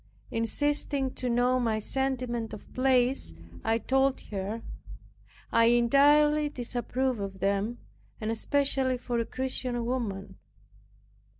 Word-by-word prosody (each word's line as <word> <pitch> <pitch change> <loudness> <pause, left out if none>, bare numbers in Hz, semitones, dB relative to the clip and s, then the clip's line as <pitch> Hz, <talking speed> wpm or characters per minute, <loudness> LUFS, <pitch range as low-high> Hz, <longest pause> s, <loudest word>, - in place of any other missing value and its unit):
Insisting 275 +3 -1
to 250 - -3
know 245 +2 +2
my 225 -3 0
sentiment 240 -2 -1
of 205 - -15
plays, 255 - +1 0.3
I 225 - +2
told 265 +3 +1
her, 205 +3 -4 0.9
I 230 - +4
entirely 290 +5 +4
disapproved 250 -1 -2
of 195 -1 -5
them, 200 +5 0 0.4
and 220 -1 -2
especially 265 +2 +2
for 240 -1 -3
a 230 - 0
Christian 250 -1 -1
woman. 225 -6 -4
245 Hz, 110 wpm, -28 LUFS, 225-265 Hz, 0.9 s, I